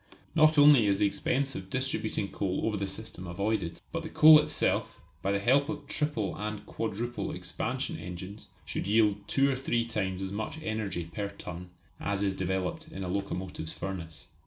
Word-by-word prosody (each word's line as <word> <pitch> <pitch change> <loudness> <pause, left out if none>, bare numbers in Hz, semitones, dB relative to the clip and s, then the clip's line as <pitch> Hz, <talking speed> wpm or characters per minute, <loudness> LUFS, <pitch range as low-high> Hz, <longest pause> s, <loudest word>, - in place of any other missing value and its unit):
Not 155 -1 +5
only 145 -6 +8
is 100 -1 +3
the 105 - +3
expense 135 +7 0
of 95 -3 -7
distributing 110 -5 -1
coal 95 -1 -1
over 110 -1 0
the 100 -1 -2
system 95 -2 -5
avoided, 90 -1 -2
but 165 - -2
the 160 - -6
coal 155 0 +9
itself, 150 0 0 0.2
by 100 - 0
the 100 - +2
help 135 +8 +3
of 150 -2 -4
triple 140 - -1
and 105 0 -4
quadruple 115 +2 -3
expansion - - -3
engines 90 +4 -8 0.2
should - - -3
yield 105 -1 +3
two 135 +5 +3
or - - 0
three 120 -3 0
times 95 -5 -2
as 95 - -4
much 110 +8 -4
energy 105 -6 -2
per 100 -1 -2
ton 90 -2 -8 0.3
as 100 0 -1
is 100 -1 +1
developed 95 - -2
in 155 -12 -6
a - - -3
locomotive 95 -3 -3
furnace. 85 -4 -6
105 Hz, 180 wpm, -30 LUFS, 95-130 Hz, 0.3 s, coal